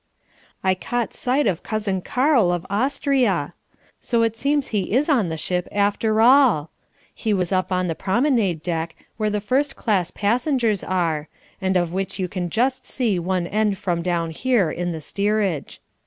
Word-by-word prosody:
I 190 -1 +3
caught 240 +5 -3
sight 260 +3 0
of 185 -5 0
Cousin 205 -4 -2
Karl 250 - +2
of 175 -1 -2
Austria! 235 - +1 0.5
So 235 -1 +1
it 225 -1 0
seems 280 +3 0
he 200 -3 -1
is 270 +5 +3
on 235 - +2
the 160 - -3
ship 180 +3 -2
after 205 +2 +1
all. 235 - +5 0.4
He 215 -3 -1
was 180 -3 -1
up 185 0 0
on 185 0 +1
the 170 - -1
promenade 195 - +1
deck 165 -2 -3 0.2
where 215 -1 0
the 210 0 -1
first 265 +7 0
class 190 -6 0
passengers 230 - 0
are, 165 -5 -1 0.3
and 190 -1 +1
of 175 -1 -1
which 190 +1 -3
you 185 -2 -1
can 180 -1 -4
just 255 +7 0
see 225 -8 0
one 180 0 -1
end 210 +1 0
from 175 -3 -1
down 170 -2 -1
here 215 -2 +1
in 175 +2 -3
the 160 -1 -5
steerage. 200 -2 -1
200 Hz, 170 wpm, -22 LUFS, 175-235 Hz, 0.5 s, all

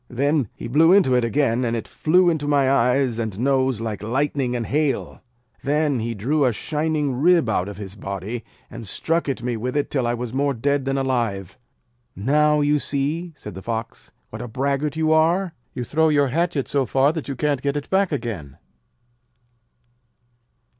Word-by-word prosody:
Then 140 -1 0
he - - -7
blew 160 +7 +5
into 185 -9 +5
it 125 -1 +3
again, 125 0 +1
and 115 -1 0
it 115 - -4
flew 180 +3 +3
into 150 -3 -2
my 140 -2 +3
eyes 125 -2 +2
and 110 -4 -3
nose 130 -1 +1
like 110 -3 -4
lightning 130 +2 -1
and 120 -2 -2
hail. 145 -1 -1 0.4
Then 145 -1 +1
he 115 +1 -3
drew 140 +9 0
a 125 - +3
shining 150 +4 -1
rib 170 -4 +4
out 100 -3 0
of 100 - -8
his 100 -2 -7
body, 100 +4 -5 0.3
and 115 - -8
struck 165 - -1
at 130 -3 -3
me 120 -1 -1
with 125 +5 -3
it 145 - -1
till 130 -4 0
I 120 - 0
was 120 -1 -5
more 140 0 0
dead 140 +3 0
than 135 0 0
alive.' 115 -8 -1 0.6
'Now, 150 +7 +2
you 145 0 +2
see,' 150 +6 -2
said 105 -8 -9
the 95 - -8
Fox, 115 +1 -5 0.2
'what 110 - -7
a 120 - -5
braggart 140 +4 -1
you 160 0 +1
are. 170 +3 +2 0.2
You 125 - -3
throw 160 +5 +2
your 145 -2 +3
hatchet 160 -1 0
so 135 -3 0
far 135 +3 +3
that 160 -3 -5
you 140 - -3
can't 145 -1 0
get 140 +1 -1
it 145 - -5
back 190 -1 +2
again.' 105 - -4
135 Hz, 190 wpm, -22 LUFS, 115-150 Hz, 0.6 s, blew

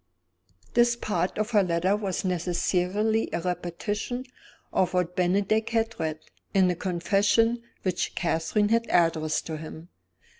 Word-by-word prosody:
This 240 0 +4
part 185 -6 -2
of 215 +2 -1
her 210 -3 +5
letter 180 +2 +1
was 200 -3 -3
necessarily 185 +4 0
a - - -1
repetition 180 +8 -3 0.5
of 185 -1 +1
what 180 -1 0
Bennydeck 195 +5 +1
had 230 0 -1
read, 155 -1 -1 0.4
in 190 -1 +5
the 180 - 0
confession 200 +7 +2 0.2
which 185 -2 -1
Catherine 175 +5 +1
had 230 +1 +2
addressed 160 -3 +2
to 160 -1 -4
him. 160 +2 -9
185 Hz, 135 wpm, -27 LUFS, 170-215 Hz, 0.5 s, her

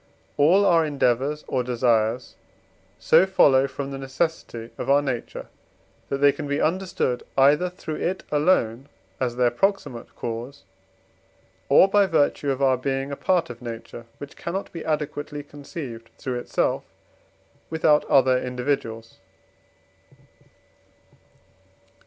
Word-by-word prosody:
All 175 +8 +4
our 170 -3 +4
endeavours 140 0 0
or 130 -1 0
desires 120 -1 0 0.6
so 190 - +4
follow 135 -8 +4
from 140 0 -6
the 135 - -6
necessity 130 -4 -3
of - - -4
our 140 +1 +6
nature, 130 -4 -4 0.6
that 140 - -1
they 140 +1 +5
can 145 +1 -6
be 140 +1 -1
understood 170 -7 -1 0.2
either 145 +6 +4
through 160 -3 -6
it 185 +2 -2
alone, 145 -5 +1 0.3
as 125 -2 -1
their 125 -1 +2
proximate 195 - -2
cause, 120 +3 -6 1.1
or - - +7
by 200 0 +3
virtue 145 -3 +1
of 135 0 -1
our 130 -1 +4
being 135 +2 -2
a - - -3
part 175 -3 0
of 120 0 -12
nature, 115 0 -8
which 145 +1 -10
cannot 190 +4 -5
be 165 - -7
adequately 150 -1 -3
conceived 140 -5 -9
through 125 -2 -3
itself - - -1 0.9
without 155 -2 +3
other 130 -2 +4
individuals. 125 -3 -3
140 Hz, 125 wpm, -24 LUFS, 125-155 Hz, 1.1 s, or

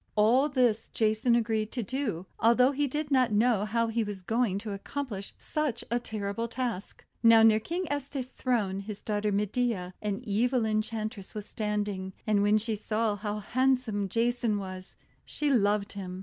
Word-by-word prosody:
All 240 +7 +4
this 245 -5 +2
Jason 220 +2 +2
agreed 220 -2 0
to 245 - -2
do, 215 -7 -3
although 250 +3 +5
he 285 +1 0
did 295 +2 -3
not 255 -3 +4
know 215 -1 +3
how 230 +2 +1
he 225 0 0
was 205 -3 -6
going 225 -1 +1
to 210 +1 -5
accomplish 200 0 -5
such 295 -7 -2
a 240 - +2
terrible 215 -1 -3
task. 235 -5 -4 0.2
Now 230 -1 +7
near 220 -1 +6
King 345 +11 -3
Petes' 280 -3 -3
throne 210 -7 0
his 200 +1 -6
daughter 210 -1 0
Medea, 205 -2 -1
an 205 -2 -2
evil 235 +3 +1
Enchantress, 215 -1 -3
was 210 -1 -5
standing. 205 -3 -3
And 210 -2 +2
when 205 +1 +4
she 220 +1 -1
saw 215 0 -1
how 205 +1 -3
handsome 240 -2 0
Jason 230 0 +1
was, 185 -1 -7 0.3
she 295 -1 -1
loved 205 -4 +2
him. 185 -2 -6
220 Hz, 165 wpm, -29 LUFS, 205-245 Hz, 0.3 s, Now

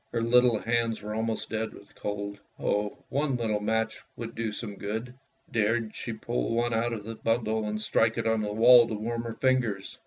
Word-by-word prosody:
Her 115 - 0
little 120 0 +5
hands 115 +1 0
were 105 0 -4
almost 110 0 -2
dead 110 0 -2
with 100 - -16
cold. 100 0 -4 0.2
Oh, 105 0 -1
one 140 -1 0
little 110 -3 0
match 110 +1 -1
would 115 0 -6
do 115 -1 -2
some 105 -1 -6
good! 110 +5 -4 0.4
Dared 115 0 +1
she 120 - -4
pull 115 +1 -2
one 120 0 +1
out 115 +1 +1
of 110 -3 -4
the 115 +2 -6
bundle 110 -1 0
and 105 0 -2
strike 115 +1 +2
it 115 - -1
on 110 -1 +2
the 105 -1 -2
wall 120 +2 +7
to 110 - -3
warm 115 +2 -2
her 115 -1 -4
fingers! 125 -7 0
115 Hz, 205 wpm, -28 LUFS, 105-115 Hz, 0.4 s, wall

